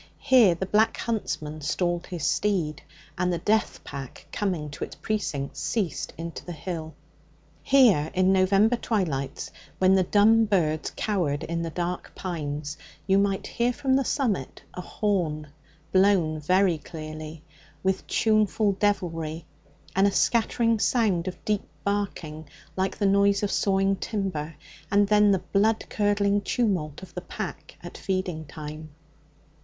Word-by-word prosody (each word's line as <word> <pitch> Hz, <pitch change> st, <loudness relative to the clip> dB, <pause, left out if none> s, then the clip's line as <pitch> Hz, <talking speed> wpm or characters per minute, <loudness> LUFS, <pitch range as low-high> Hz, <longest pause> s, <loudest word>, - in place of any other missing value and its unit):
Here 245 Hz, -10 st, +5 dB
the 190 Hz, -, -3 dB
Black 215 Hz, +3 st, +2 dB
Huntsman 155 Hz, -9 st, -3 dB
stalled 175 Hz, +3 st, -1 dB
his 170 Hz, -5 st, -4 dB
steed, 170 Hz, -5 st, 0 dB, 0.4 s
and 180 Hz, 0 st, +1 dB
the 175 Hz, -, 0 dB
death 215 Hz, +5 st, 0 dB
pack 135 Hz, -2 st, -8 dB
coming 175 Hz, -8 st, -2 dB
to -, -, -6 dB
its -, -, -7 dB
precincts, 155 Hz, -10 st, -3 dB
ceased 200 Hz, -8 st, -2 dB
into 165 Hz, 0 st, -6 dB
the 175 Hz, -, -6 dB
hill. 160 Hz, -1 st, -6 dB, 0.7 s
Here, 225 Hz, -, +5 dB
in 185 Hz, +1 st, +4 dB
November 195 Hz, +5 st, +4 dB
twilights, 155 Hz, -, -2 dB, 0.3 s
when 185 Hz, 0 st, +4 dB
the 190 Hz, -, +5 dB
dumb 215 Hz, +4 st, +4 dB
birds 160 Hz, -7 st, 0 dB
cowered 175 Hz, -9 st, -1 dB
in 170 Hz, 0 st, -2 dB
the 165 Hz, -, -3 dB
dark 175 Hz, +2 st, -4 dB
pines, 150 Hz, -4 st, -4 dB, 0.3 s
you 195 Hz, 0 st, +4 dB
might 200 Hz, -1 st, 0 dB
hear 240 Hz, +1 st, 0 dB
from 265 Hz, +1 st, 0 dB
the 270 Hz, -, +3 dB
summit 230 Hz, -, -1 dB
a 180 Hz, -, -5 dB
horn 170 Hz, -8 st, -1 dB, 0.4 s
blown 185 Hz, -5 st, +3 dB
very 180 Hz, +2 st, +2 dB
clearly, 155 Hz, -1 st, -8 dB, 0.4 s
with 190 Hz, 0 st, 0 dB
tuneful 215 Hz, -1 st, +2 dB
devilry, 170 Hz, -6 st, -1 dB, 0.5 s
and 195 Hz, +1 st, +5 dB
a -, -, +2 dB
scattered 230 Hz, +1 st, +2 dB
sound 200 Hz, -9 st, +2 dB
of 185 Hz, -, -6 dB
deep 210 Hz, -2 st, -1 dB, 0.2 s
barking 175 Hz, -7 st, -3 dB, 0.3 s
like 190 Hz, 0 st, -1 dB
the 205 Hz, -, 0 dB
noise 200 Hz, +1 st, +3 dB
of 205 Hz, -, 0 dB
sawing 195 Hz, 0 st, +2 dB
timber, 185 Hz, -8 st, -3 dB, 0.3 s
and 205 Hz, 0 st, +3 dB
then 210 Hz, 0 st, +5 dB
the 190 Hz, -2 st, +2 dB
blood 215 Hz, +2 st, +2 dB
curdling 205 Hz, -1 st, +2 dB
tumult 185 Hz, -11 st, -1 dB
of 180 Hz, -2 st, -12 dB
the 180 Hz, -, -5 dB
pack -, -, -7 dB
at -, -, -9 dB
feeding 185 Hz, -4 st, -2 dB
time. 155 Hz, +1 st, -8 dB
185 Hz, 145 wpm, -26 LUFS, 160-205 Hz, 0.7 s, Here